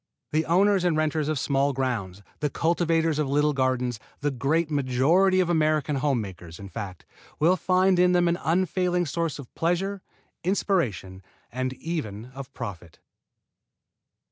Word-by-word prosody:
The 155 +1 0
owners 190 +3 +3
and 175 -3 +2
renters 155 -1 0
of 155 - 0
small 140 +1 +1
grounds, 110 -8 -3 0.2
the 150 - 0
cultivators 165 0 +1
of 150 -3 0
little 150 +1 +2
gardens 130 -3 0 0.2
the 145 +1 0
great 150 +5 0
majority 150 +8 +3
of 185 - +2
American 155 -3 +1
home 135 -2 +1
makers, 90 -5 -8
in 100 -1 -9
fact, 95 -5 -7 0.3
will 170 +4 +4
find 185 0 +2
in 180 0 +5
them 175 -1 +3
an 170 +1 +1
unfailing 180 +2 +1
source 165 +1 -2
of 140 -4 -11
pleasure, 185 +4 -1 0.4
inspiration, 125 - -1 0.3
and 130 +1 -2
even 125 -7 -5
of 135 -1 -8
profit. 90 -8 -8
150 Hz, 145 wpm, -26 LUFS, 125-175 Hz, 0.4 s, in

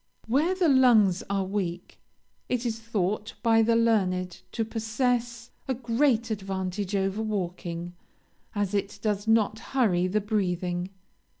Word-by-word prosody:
Where 300 +10 +2
the 365 -2 +2
lungs 235 - +5
are 195 -1 0
weak, 185 -3 -4 0.5
it 250 0 -1
is 225 -1 -2
thought 215 -1 -2
by 225 -1 +5
the 230 +1 +3
learned 185 -6 +1
to 225 - -1
possess 235 +1 -1 0.2
a 260 - 0
great 235 -1 +1
advantage 195 -1 -3
over 195 +2 0
walking, 175 -4 -4 0.6
as 205 -1 -1
it 200 0 -1
does 210 -1 -1
not 220 -1 +3
hurry 215 -8 +1
the 205 +3 +1
breathing. 180 -4 -1
215 Hz, 130 wpm, -27 LUFS, 190-230 Hz, 0.6 s, lungs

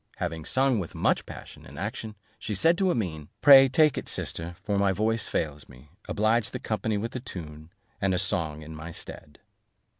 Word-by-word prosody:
Having 80 -1 -4
sung 130 +2 +2
with 90 - -6
much - - +1
passion - - -10
and 70 - -12
action, 105 +4 -5 0.2
she 105 - -3
said 165 - +4
to 190 -1 +3
Amene, 85 - -2 0.2
"Pray 135 -2 +9
take 155 +2 +4
it, - - -6
sister, 85 +1 -4
for 100 -2 0
my 100 -1 +3
voice 110 +3 0
fails 75 -2 -3
me; 65 +3 -16 0.2
oblige 110 +1 +1
the - - -5
company 110 -1 -1
with 115 +4 -4
a - - -1
tune, 80 - -9 0.3
and 95 -2 +2
a - - +1
song 80 -5 -1
in 80 +1 -9
my 80 +2 -7
stead." 75 -3 -8
95 Hz, 190 wpm, -27 LUFS, 80-115 Hz, 0.3 s, Pray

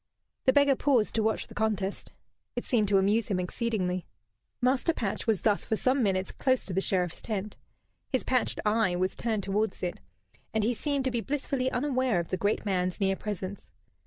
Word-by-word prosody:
The 260 - +5
beggar 285 -1 +5
paused 255 -6 +2
to 225 - +1
watch 220 0 0
the - - -13
contest. 205 -3 -1 0.4
It 245 - -3
seemed 220 -5 +2
to 195 0 +4
amuse 205 +3 +2
him 190 -3 0
exceedingly. 185 -2 -1 0.5
Master 260 +6 +2
Patch 215 -4 -3
was 220 -4 +2
thus 210 -2 +2
for 220 - 0
some 255 +4 +2
minutes 190 -3 +1
close 260 -1 +1
to 190 - -4
the 190 - +1
Sheriff's 180 -3 0
tent. 210 -2 -3 0.6
His 260 - +1
patched 255 -3 +1
eye 210 -4 +2
was 185 +1 0
turned 220 -4 -1
towards 200 +1 -1
it, 175 - -2 0.6
and 220 - +2
he 235 +3 +2
seemed 280 +2 -1
to 260 - +1
be 235 -1 -1
blissfully 270 -1 -1
unaware 255 -6 +1
of 170 - -4
the 185 - -1
great 205 +3 0
man's 185 -1 0
near 195 -1 +2
presence. 200 -1 -5
215 Hz, 190 wpm, -29 LUFS, 190-250 Hz, 0.6 s, The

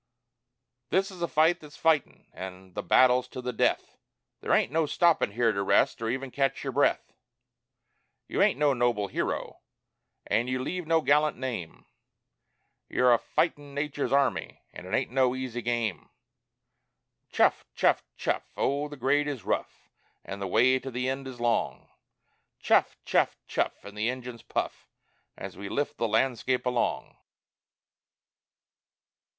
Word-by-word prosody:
This 195 +2 +1
is 180 -2 -11
a 170 - +1
fight 165 +3 +3
that's 150 -1 -13
fightin', 160 -4 +1
an' 95 0 -9
the - - -3
battle's 125 +6 +4
to - - -8
the 125 0 -4
death; - - 0 0.4
There - - -3
ain't - - +3
no 160 0 +1
stoppin' 170 - +2
here 115 0 +2
to 100 - -2
rest 100 - +2
or 115 - -1
even 130 +2 -3
catch 135 0 0
your 135 -2 -3
breath; 140 +2 +1 1.1
You - - -1
ain't - - +4
no 145 -1 +3
noble 120 -5 0
hero, - - -3 0.7
an' 120 +3 +1
you 130 0 -1
leave 175 +6 -4
no 165 0 +3
gallant 150 0 +3
name 120 -10 -5 1.0
You're 125 -1 +4
a 120 - +3
fightin' 145 -4 -1
Nature's 145 0 -2
army, 140 -1 0
an' 90 - -9
it 100 - +1
ain't 130 - -2
no 130 -1 +2
easy 130 -2 -4
game! 115 -5 -2 1.2
"Chuff! - - +3
chuff! - - +3
chuff!" - - -2
Oh, 140 +2 0
the 145 0 -10
grade 145 +3 +2
is 140 -6 -4
rough, - - -3 0.4
An' 100 - -6
the 100 - -3
way 125 +7 +4
to 135 - -7
the 125 +1 -2
end 135 0 -4
is 125 -2 -9
long, 120 -1 -1 0.7
"Chuff! - - +2
chuff! - - +2
chuff!" - - -2
an' 100 - -9
the 105 +3 -1
engines 125 -2 -6
puff - - -4 0.5
As - - -7
we 100 +1 -6
lift 145 +6 -2
the 115 - 0
landscape 125 +2 +1
along! 125 -1 -1
130 Hz, 155 wpm, -28 LUFS, 115-145 Hz, 1.2 s, battle's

